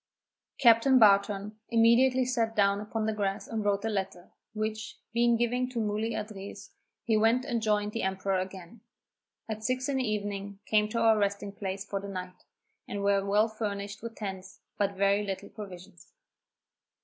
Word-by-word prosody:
Captain 240 +1 +6
Barton 205 -1 +3
immediately 245 +3 +4
sat 230 -3 0
down 200 -1 +3
upon 215 +1 -3
the 220 - 0
grass 200 -1 -2
and 225 -2 -3
wrote 200 +1 0
a - - +1
letter, 190 -4 -4 0.2
which, 215 0 -3 0.2
being 235 0 +4
given 245 +2 0
to 250 -2 -3
Muli 215 +1 -1
Adriz, 205 -2 -7 0.3
he 225 -3 +1
went 225 +4 +3
and 235 -2 -1
joined 210 -1 +1
the 230 - -3
emperor 190 0 0
again. 185 +3 -7 0.7
At 220 -1 -5
six 255 +2 0
in 280 -1 0
the 260 - +1
evening 200 -1 -3
came 210 -1 +2
to 230 - -1
our 220 -1 +4
resting 200 0 -1
place 195 0 -5
for 200 - -3
the 200 - -7
night, 185 -1 -7 0.4
and 200 0 -4
were 200 -1 +3
well 205 +2 +3
furnished 205 -2 -5
with 230 0 -7
tents, 190 -3 -7
but 200 -1 0
very 200 +1 +3
little 195 -2 -5
provisions. 185 -4 -11
210 Hz, 170 wpm, -29 LUFS, 200-225 Hz, 0.7 s, Captain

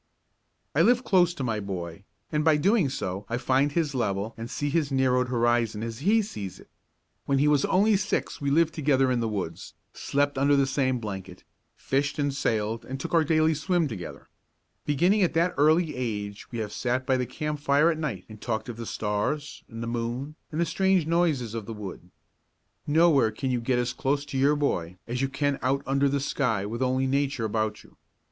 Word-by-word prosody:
I 145 - +3
live 245 +6 +4
close 180 -6 +4
to 140 - -4
my 115 -3 -1
boy, 95 -2 -6 0.3
and 150 0 +1
by 160 -1 +5
so 150 - -1
doing 195 -6 +3 0.4
I 115 - -1
find 130 +3 +2
his 155 -2 0
level 105 -3 -1
and 115 +1 -7
see 145 +1 -2
his 150 -2 0
narrowed 130 -1 +2
horizon 120 -3 +1
as 115 -1 -5
he 210 +8 +3
sees 100 - -7
it. - - -18 0.6
When 140 - +2
he 145 +2 +3
was 145 -2 +3
only 205 +3 +3
six 190 -4 -2
we 140 - 0
lived 160 +3 +3
together 135 -4 +2
in 125 - +1
the 115 - 0
woods, 100 -3 -5 0.2
slept 145 -1 0
under 140 +1 +4
the 140 -1 +3
same 130 -1 0
blanket, 95 -5 -7 0.3
fished 140 +2 -1
and 145 -1 0
sailed 110 -4 -1
and 135 +1 -6
took - - -5
our 165 -1 +5
daily 155 +1 +3
swim 165 +2 0
together. 105 -9 -8 0.6
Beginning 175 +9 +3
at 180 - +1
that 170 +2 +2
early 155 +2 +3
age 105 -5 -4
we 120 - -5
have 105 -2 -4
sat 125 +1 -1
by 130 - +2
the 125 -1 -1
campfire 150 +1 +1
at 160 - -4
night 125 - -3
and 110 -1 -12
talked 115 +1 -3
of 115 - -6
the 115 -1 -6
stars 125 +8 -2
and 115 0 -6
the - - -4
moon 120 +5 -3 0.2
and 155 - -3
the 170 - +3
strange 190 -2 +2
noises 160 -9 +1
of 115 -3 -5
the 115 - -5
wood. 95 -4 -8 0.8
Nowhere 150 -5 +4
can 130 +4 -3
you 125 -1 0
get 125 +1 +1
as 125 +1 -1
close 140 +3 -1
to 140 -2 -5
your 145 +2 +4
boy 90 - -1
as 125 +2 -3
you 135 - 0
can 140 0 -1
out 135 +2 0
under 140 +1 +2
the 140 +1 0
sky 125 -7 0
with 115 +4 -4
only 130 +1 +1
Nature 135 -2 0
about 110 0 -2
you. - - -21
135 Hz, 205 wpm, -26 LUFS, 115-150 Hz, 0.8 s, by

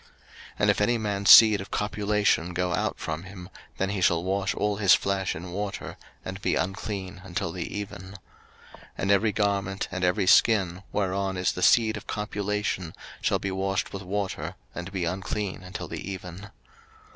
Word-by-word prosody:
03:015:016 - - -26 0.5
And - - +2
if - - -2
any 120 +3 +3
man's 100 -2 -1
seed 110 -3 +9
of 95 - -9
copulation 105 -4 0
go 90 0 0
out - - -1
from 80 0 -4
him, 95 -1 -10 0.3
then 95 0 -1
he 100 -2 -2
shall 85 -2 +3
wash 95 +1 -1
all 105 -1 0
his 100 -2 +6
flesh 95 -1 -1
in 85 +3 -7
water, 100 +1 -4 0.3
and 95 +1 -6
be - - +1
unclean 95 0 -4
until 90 -3 -3
the 85 0 -5
even. 100 -3 -6
03:015:017 95 +2 -11 0.8
And 100 - 0
every 100 +2 +3
garment, 100 -2 -1
and 95 -2 -3
every 90 +2 +2
skin, 95 -3 +4
whereon 95 -1 -1
is 90 0 +1
the 90 - -6
seed 110 +2 +4
of - - -11
copulation, 105 -4 -3 0.3
shall - - +2
be 95 - -3
washed 95 0 -2
with 100 - -5
water, 95 -4 -3 0.2
and 90 +2 -6
be 95 -3 -2
unclean 95 +2 -3
until 90 0 -7
the - - -6
even. 95 +1 -8
95 Hz, 180 wpm, -26 LUFS, 90-105 Hz, 0.8 s, seed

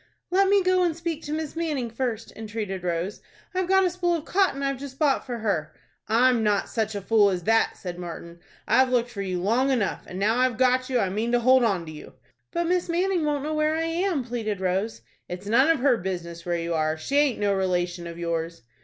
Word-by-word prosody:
"Let 385 +1 +4
me 400 -1 +4
go 370 0 +3
and 340 -3 +1
speak 335 -2 -3
to 295 - -5
Miss 310 0 -3
Manning 295 -8 -2
first," 230 -2 -3
entreated 210 -4 -5
Rose. 175 +3 -2 0.3
"I've 370 -1 -1
got 385 0 +4
a - - +3
spool 350 -1 0
of 320 -2 -5
cotton 365 -8 +1
I've 275 -1 -1
just 275 -1 -8
bought 285 -3 +2
for 245 -2 -3
her." 185 -9 -2 0.3
"I'm 240 +2 +4
not 210 -2 +1
such 220 -2 -2
a 200 - -3
fool 210 -1 +4
as 180 -2 -2
that," 225 +3 +2
said 180 -1 -7
Martin. 170 -1 -8 0.3
"I've 260 +3 +4
looked 245 -1 +1
for 200 - -5
you 185 -2 -2
long 230 +9 +2
enough, 240 -7 0
and 180 - -7
now 215 +5 +1
I've 255 -3 +2
got 255 +1 +2
you 255 - +1
I 195 -5 +1
mean 220 +5 -1
to 245 - +4
hold 255 +1 +5
on 195 -7 +1
to 155 - -8
you." 150 - -11 0.4
"But 340 0 0
Miss 355 0 0
Manning 355 0 +1
won't 290 -2 -1
know 310 +1 -2
where 305 0 +1
I 325 - 0
am," 335 -3 0
pleaded 225 -4 -3
Rose. 190 +4 -1 0.3
"It's 180 +2 -6
none 245 +8 +4
of 325 -6 +2
her 260 -3 +4
business 175 -3 -5
where 175 -1 0
you 170 0 -2
are. 155 0 0
She 275 - -2
aint 290 -5 +2
no 205 -1 +1
relation 180 -2 -1
of 170 0 -8
yours." 165 -4 -3
230 Hz, 235 wpm, -25 LUFS, 190-295 Hz, 0.4 s, hold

